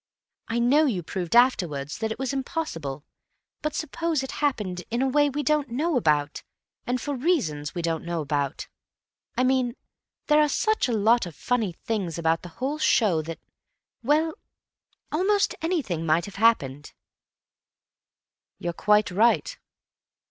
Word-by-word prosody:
I 225 - -2
know 275 +6 +4
you 190 -9 -1
proved 175 +3 -3
afterwards 165 - +2
that 220 -1 -2
it - - -4
was 265 0 -2
impossible, 165 - -4 0.6
but 305 -1 -2
suppose 315 -1 -1
it 265 - -5
happened 210 -11 -1
in 235 - -1
a - - +2
way 290 +2 +3
we 290 +2 -3
don't 295 0 +1
know 300 +7 0
about 150 - +1 0.5
and 250 +1 0
for 290 +3 -3
reasons 185 - -1
we 175 - -3
don't 165 -1 -1
know 170 0 -3
about. 145 -2 -2 0.7
I 255 - +3
mean, 255 -2 +1 0.5
there 300 0 +5
are 300 - +3
such 435 +4 +1
a - - -1
lot 220 0 +3
of 165 - -10
funny 225 -7 -1
things 185 -3 -3
about 165 0 +1
the 175 - -9
whole 280 +4 -2
show 200 - +3
that—well, 290 - -3 0.8
almost 395 +6 +2
anything 290 - -1
might 165 +1 +2
have 200 - -10
happened." 145 - +1 1.6
"You're 175 0 -3
quite 210 +2 +3
right. 230 - +2
230 Hz, 150 wpm, -25 LUFS, -, 1.6 s, there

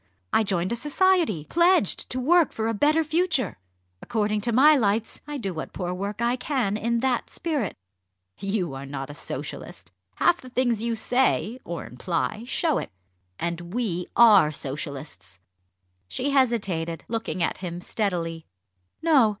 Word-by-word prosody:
I - - +5
joined 190 -3 0
a - - +1
society, 295 - +2
pledged 345 - +2
to 255 - -2
work 330 +5 +4
'for 220 0 -2
a 225 - 0
better 300 +8 +3
future.' 315 - 0 0.4
According 215 -2 0
to 235 - +1
my 290 +6 +7
lights, 220 -3 0
I 295 -1 -4
do 195 -8 -3
what 160 - -6
poor 180 -2 -3
work 200 +4 -3
I 240 +1 +2
can 250 -7 -1
in 235 +2 0
that 255 -2 0
spirit." 295 - -2 0.6
"You 195 -6 -1
are 135 +1 -7
not 135 0 -5
a - - -8
Socialist. 145 - -7 0.2
Half 350 - +3
the 255 - -11
things 245 -3 +1
you 230 0 0
say, 245 0 +1
or 170 -1 -5
imply, 170 - -3
show 310 +2 +1
it. - - -6 0.5
And 170 +2 -4
we 185 -8 -1
are 210 -9 +7
Socialists." 135 - -6 0.7
She 260 - -2
hesitated, 200 - +1
looking 225 -6 -2
at - - -1
him 175 -2 -5
steadily. 170 -5 -2 0.6
"No! 285 -9 +5
220 Hz, 155 wpm, -25 LUFS, 175-260 Hz, 0.7 s, my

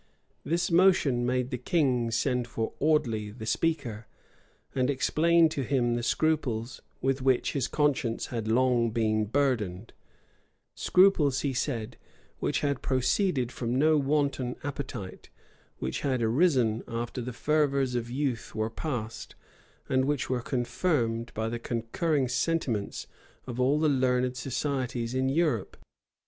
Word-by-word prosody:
This 170 +4 0
motion 165 -9 +4
made 125 +1 0
the 125 - -3
king 125 -5 +1
send 120 +2 0
for 115 -2 -3
Audley, 120 -9 +1
the 110 +1 -8
speaker, 120 -6 -1 0.7
and 130 0 +1
explain 165 +4 +3
to 145 - -3
him 125 -2 +1
the 120 - -1
scruples 120 -4 -1 0.2
with 135 0 0
which 130 -1 +2
his 135 -3 0
conscience 145 -6 0
had 115 -2 -3
long 120 0 +3
been 110 -1 +1
burdened; 115 -6 -1 0.8
scruples, 165 -8 +3
he 140 -2 -1
said, 120 -4 -3 0.4
which - - 0
had 140 -2 -1
proceeded 130 - +1
from 120 +1 -2
no 155 +3 +4
wanton 140 -3 0
appetite, 130 -9 -6 0.5
which - - -3
had 130 -4 0
arisen 120 -3 +2
after 120 +2 -4
the 125 +1 -4
fervors 140 -1 +1
of 120 -1 -2
youth 130 -4 -3
were 110 0 -1
past, 115 -5 -5 0.5
and 130 0 +2
which 145 -2 -1
were 125 -1 0
confirmed 120 -2 -1
by 110 +1 -1
the 120 +1 -3
concurring 125 +6 -1
sentiments 125 -5 -1 0.4
of 125 -1 -6
all 135 +4 +3
the 155 - +3
learned 125 -2 +1
societies 125 -2 -2
in 130 +1 +1
Europe. 145 - 0
130 Hz, 135 wpm, -28 LUFS, 115-145 Hz, 0.8 s, motion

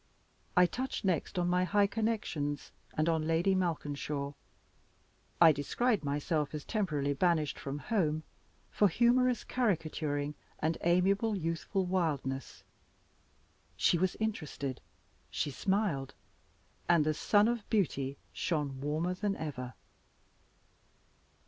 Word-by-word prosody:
I 180 - +8
touched 255 +4 -3
next 180 -1 0
on 175 -1 +1
my 180 +1 +2
high 200 +3 +3
connections, 200 -10 -2 0.3
and 155 +1 +2
on 160 -2 +1
Lady 165 +4 +3
Malkinshaw; 145 -5 -2 1.1
I 165 -2 +9
described 205 - 0
myself 145 +1 -1
as 150 - -6
temporarily 150 -10 0
banished 155 -1 +1
from 140 +1 -4
home 155 -3 0 0.5
for 205 - +4
humorous 245 +5 +3
caricaturing, 155 - -1 0.2
and 160 +1 0
amiable 195 +5 +3
youthful 165 +2 -1
wildness. 150 -7 -2 1.1
She 170 - +3
was 185 0 0
interested; 150 - -3 0.5
she 145 - -2
smiled 185 - -1 0.7
and 170 -3 +5
the 155 - +2
sun 205 +7 +3
of 235 -3 -2
beauty 140 - 0 0.2
shone 145 -5 -2
warmer 155 +5 0
than 195 +2 -1
ever! 130 -7 -5
165 Hz, 110 wpm, -32 LUFS, 145-195 Hz, 1.1 s, I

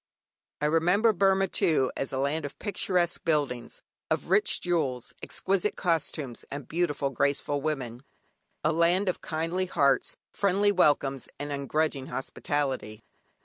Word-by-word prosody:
I - - +1
remember 180 +8 +3
Burmah, 195 0 +3
too, 145 -7 +2
as 135 - -3
a 130 - -2
land 140 +4 0
of 145 - -6
picturesque 180 -4 0
buildings, 140 -7 -1 0.3
of - - -1
rich 205 +2 +3
jewels, 145 -9 -1
exquisite 195 +2 0
costumes, 155 -7 -1
and 140 -2 -6
beautiful 155 -5 0
graceful 140 +2 0
women. 130 -6 -3 0.6
A 155 - +3
land 175 +4 +3
of 185 - -1
kindly 165 +4 -2
hearts, 140 -5 +2
friendly 200 +1 +2
welcomes, 145 -7 +2
and 145 0 -5
ungrudging 140 0 -1
hospitality. 130 -5 -3
155 Hz, 130 wpm, -28 LUFS, 140-180 Hz, 0.6 s, remember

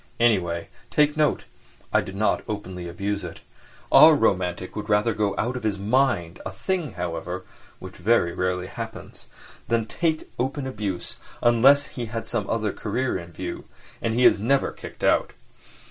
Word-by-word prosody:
Anyway, 90 -8 +2 0.2
take 150 0 +3
note, 155 -1 +2 0.5
I - - +5
did 95 - -8
not 105 +2 +1
openly 95 -4 -5
abuse 100 +3 -3
it. 85 - -8 0.5
Our 160 -1 +9
romantic 90 -7 0
would 105 0 -5
rather 105 +2 +3
go 105 -2 0
out 125 +3 -1
of 125 - -4
his 105 -3 -1
mind—a 100 -6 0
thing, 155 - -2
however, 90 0 -4 0.3
which 95 -1 -10
very 90 -3 +2
rarely 90 0 -1
happens—than 115 +4 -6
take 160 +5 0
to - - -14
open 135 +2 -1
abuse, 105 -8 -4 0.3
unless 135 +5 +6
he 120 -4 -6
had 115 +1 -4
some 110 -5 -3
other 110 -3 0
career 120 +4 -2
in 85 0 -10
view; - - -6 0.4
and 115 0 -1
he 125 +1 +4
is - - +6
never 135 +6 +2
kicked - - -11
out. - - +2
105 Hz, 160 wpm, -24 LUFS, 90-125 Hz, 0.5 s, Our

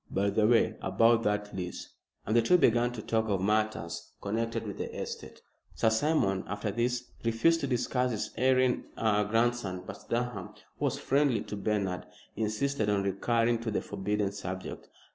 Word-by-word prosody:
By 100 +1 +1
the 105 +1 +3
way, 120 0 +3
about 115 0 +4
that 105 -1 -1
lease," 90 -2 -6 0.3
and 110 - 0
the 120 - +6
two 180 +10 +5
began 120 -6 +3
to 110 -3 -6
talk 110 -1 0
of 100 -2 +1
matters 95 -5 -1
connected 115 +3 -2
with - - -6
the - - -3
estate. - - -7 0.3
Sir 110 - +3
Simon 110 -7 +2
after 100 +2 -3
this 120 +3 -1
refused 115 +9 +3
to 140 - -2
discuss 125 0 0
his 110 -2 -3
erring 130 +1 +3
grandson, 110 -2 +1
but - - -9
Durham, 120 +1 -2 0.2
who - - 0
was - - 0
friendly 135 -5 +2
to - - -6
Bernard, 100 -3 -1 0.3
insisted 110 +2 0
on 100 -1 +2
recurring 115 +4 +1
to 115 0 -3
the 105 - -1
forbidden 105 0 -1
subject. 95 -2 -6
110 Hz, 165 wpm, -30 LUFS, 100-120 Hz, 0.3 s, the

